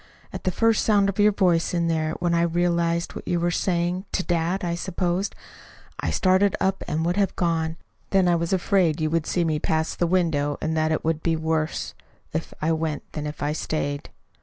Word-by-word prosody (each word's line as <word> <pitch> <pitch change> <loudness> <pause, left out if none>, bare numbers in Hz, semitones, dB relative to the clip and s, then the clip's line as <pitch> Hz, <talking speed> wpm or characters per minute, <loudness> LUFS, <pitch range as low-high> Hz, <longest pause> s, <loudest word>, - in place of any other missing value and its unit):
At - - -7
the 185 - +2
first 225 +3 +2
sound 200 -2 +3
of 195 - -4
your 210 +1 +6
voice 180 -4 +2
in 170 -1 +1
there, 160 -1 0
when 175 0 -1
I 170 - +3
realized 170 0 +1
what - - -9
you 175 - +1
were 175 +1 +1
saying 175 +1 0
(to 185 - 0
dad, 175 +2 0
I 170 -1 -1
supposed), 180 +2 -2 0.6
I - - -1
started 190 0 +3
up 190 0 0
and 160 +2 -1
would 175 +3 0
have 195 -2 +1
gone. 165 -2 0 0.3
Then 190 -2 +3
I 175 - +4
was 170 0 -1
afraid 180 -3 +2
you 155 -1 0
would 165 -1 0
see 175 - +1
me 155 -2 0
pass 160 +1 0
the 175 - 0
window, 160 -5 +1
and 160 +1 -1
that 155 0 +1
it 155 - -1
would 160 -1 0
be 165 -1 +1
worse 160 0 -1 0.4
if 160 +1 -3
I 160 - +2
went 160 -2 -2
than 150 -1 -4
if 150 0 -6
I 145 - +1
stayed. 145 -2 -3
170 Hz, 210 wpm, -24 LUFS, 160-185 Hz, 0.6 s, your